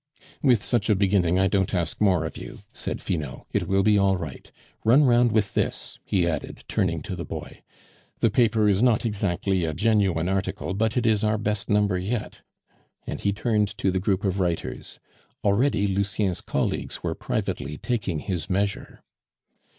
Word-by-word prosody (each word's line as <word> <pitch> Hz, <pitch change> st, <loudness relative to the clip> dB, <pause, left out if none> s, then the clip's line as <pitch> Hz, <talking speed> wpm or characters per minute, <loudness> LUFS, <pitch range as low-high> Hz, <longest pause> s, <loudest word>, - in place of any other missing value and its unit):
"With 125 Hz, -7 st, +3 dB
such 115 Hz, -3 st, 0 dB
a 105 Hz, -, +5 dB
beginning, 95 Hz, -3 st, +2 dB
I 95 Hz, -, +3 dB
don't 95 Hz, 0 st, +1 dB
ask 85 Hz, +1 st, -2 dB
more 90 Hz, -6 st, +3 dB
of -, -, -5 dB
you," -, -, -9 dB
said -, -, -4 dB
Finot; 75 Hz, -7 st, -3 dB
"it -, -, -1 dB
will 95 Hz, 0 st, +2 dB
be 105 Hz, 0 st, +4 dB
all 95 Hz, -1 st, +3 dB
right. 80 Hz, -6 st, -8 dB, 0.3 s
Run 130 Hz, +7 st, +6 dB
round 120 Hz, -2 st, +4 dB
with 105 Hz, -2 st, +1 dB
this," -, -, -2 dB
he 90 Hz, -3 st, +1 dB
added, 85 Hz, -, -4 dB
turning -, -, 0 dB
to -, -, -5 dB
the -, -, -5 dB
boy; -, -, -8 dB, 0.6 s
"the -, -, +2 dB
paper 110 Hz, -3 st, +3 dB
is 100 Hz, 0 st, +3 dB
not 120 Hz, -1 st, +3 dB
exactly 100 Hz, -3 st, 0 dB
a 80 Hz, -2 st, -2 dB
genuine 95 Hz, -4 st, +2 dB
article, 95 Hz, 0 st, -2 dB
but 110 Hz, +4 st, 0 dB
it 125 Hz, -, +1 dB
is 110 Hz, -2 st, +2 dB
our 110 Hz, 0 st, +2 dB
best 105 Hz, -1 st, -2 dB
number 105 Hz, -3 st, +2 dB
yet," 105 Hz, +4 st, -3 dB, 0.7 s
and -, -, -5 dB
he 100 Hz, -, +1 dB
turned 105 Hz, -1 st, 0 dB
to 95 Hz, -, +1 dB
the 95 Hz, -, 0 dB
group 95 Hz, 0 st, 0 dB
of 95 Hz, -1 st, 0 dB
writers. 85 Hz, -3 st, -3 dB, 0.4 s
Already 105 Hz, +1 st, +2 dB
Lucien's 100 Hz, -1 st, 0 dB
colleagues -, -, -2 dB
were -, -, -1 dB
privately 75 Hz, +1 st, -3 dB
taking 110 Hz, -9 st, -2 dB
his 90 Hz, +1 st, -4 dB
measure. 100 Hz, +1 st, -2 dB
100 Hz, 175 wpm, -25 LUFS, 95-110 Hz, 0.7 s, Run